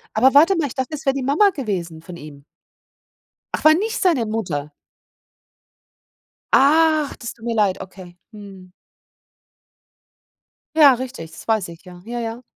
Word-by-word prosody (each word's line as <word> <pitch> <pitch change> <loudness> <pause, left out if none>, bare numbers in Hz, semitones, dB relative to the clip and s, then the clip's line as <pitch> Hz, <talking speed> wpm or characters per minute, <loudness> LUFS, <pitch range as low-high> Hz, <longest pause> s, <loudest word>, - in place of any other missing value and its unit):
Aber 260 +5 +4
warte 325 +7 +5
mal, 315 -4 -1
ich - - -10
dachte, 260 +3 -4
es 300 +1 -10
wär 270 - +2
die 275 -2 -4
Mama 310 +10 +3
gewesen 180 - -5
von 170 +1 -11
ihm. 145 -2 -13 1.1
Ach, - - -3
war 310 - +8
nicht 435 +7 -2
seine 325 -11 +2
Mutter? 175 -10 -4 1.8
Ach, 310 +1 +3
das 235 - -7
tut 230 - -15
mir 230 -1 -2
leid, 200 -4 +1
okay, 185 -2 -12
mhm. 195 -3 -13 2.0
Ja, 290 -4 +7
richtig, 245 -11 -7
das - - -13
weiß 215 -6 0
ich, 165 0 -13
ja, 180 -1 -13
ja, 240 +1 -5
ja. 230 +1 -5
230 Hz, 155 wpm, -20 LUFS, 180-280 Hz, 2.0 s, war